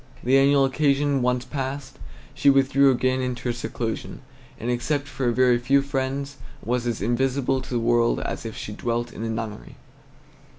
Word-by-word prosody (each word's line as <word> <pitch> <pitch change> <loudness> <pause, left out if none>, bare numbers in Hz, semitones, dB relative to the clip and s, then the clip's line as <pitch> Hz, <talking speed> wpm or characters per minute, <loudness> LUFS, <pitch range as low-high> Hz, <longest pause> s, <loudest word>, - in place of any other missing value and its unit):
The 130 +2 +3
annual 140 0 +4
occasion 140 0 +1
once 125 0 0
past, 135 - -5 0.3
she 140 - +3
withdrew 135 0 +4
again 130 0 +1
into 125 -1 -3
her 120 - 0
seclusion, 115 -1 -5 0.4
and 120 +2 -2
except 140 +4 -1
for 130 -2 -1
a - - +2
very 125 0 +3
few 135 +3 +3
friends 140 0 -3 0.3
was 120 +1 -1
as 115 -5 -2
invisible 130 +3 0
to - - -11
the 120 - 0
world 120 0 +2
as - - -4
if 115 -2 -7
she - - -6
had 105 - -10
dwelt 120 0 -2
in - - -8
a 115 - -2
nunnery. 110 -2 -5
130 Hz, 180 wpm, -24 LUFS, 120-135 Hz, 0.4 s, annual